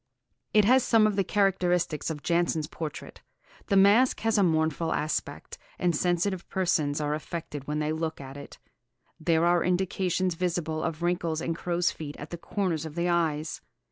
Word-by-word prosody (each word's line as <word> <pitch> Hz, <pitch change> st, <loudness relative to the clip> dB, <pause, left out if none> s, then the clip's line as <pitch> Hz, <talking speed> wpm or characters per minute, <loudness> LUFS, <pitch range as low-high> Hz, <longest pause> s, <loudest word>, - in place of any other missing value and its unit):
It 210 Hz, -1 st, +5 dB
has 255 Hz, +4 st, +5 dB
some 225 Hz, -3 st, +4 dB
of 210 Hz, -2 st, +1 dB
the 195 Hz, -, +2 dB
characteristics 180 Hz, -5 st, +1 dB
of 150 Hz, -2 st, -5 dB
Jansen's 170 Hz, -2 st, +1 dB
portrait. 155 Hz, -1 st, -7 dB, 0.5 s
The 200 Hz, -, +1 dB
mask 205 Hz, +7 st, +5 dB
has 225 Hz, -2 st, +2 dB
a -, -, +4 dB
mournful 160 Hz, -1 st, +1 dB
aspect, 155 Hz, +1 st, -3 dB, 0.2 s
and 175 Hz, -2 st, +1 dB
sensitive 175 Hz, +3 st, 0 dB
persons 160 Hz, -6 st, 0 dB
are 150 Hz, 0 st, -1 dB
affected 150 Hz, -2 st, -6 dB
when 150 Hz, 0 st, -2 dB
they 150 Hz, 0 st, -1 dB
look 160 Hz, 0 st, -3 dB
at 135 Hz, -1 st, -9 dB
it.... 140 Hz, 0 st, -10 dB, 0.6 s
There 165 Hz, 0 st, +2 dB
are 175 Hz, 0 st, +3 dB
indications 185 Hz, 0 st, 0 dB
visible... 165 Hz, -2 st, -2 dB
of 165 Hz, 0 st, -3 dB
wrinkles 170 Hz, -2 st, 0 dB
and 165 Hz, 0 st, -2 dB
'crow's 175 Hz, +1 st, 0 dB
feet' 150 Hz, -2 st, -8 dB
at 145 Hz, -, -9 dB
the 170 Hz, -, -6 dB
corners 175 Hz, -5 st, -2 dB
of 160 Hz, -1 st, -7 dB
the 175 Hz, 0 st, 0 dB
eyes. 160 Hz, -3 st, 0 dB
170 Hz, 175 wpm, -27 LUFS, 155-185 Hz, 0.6 s, It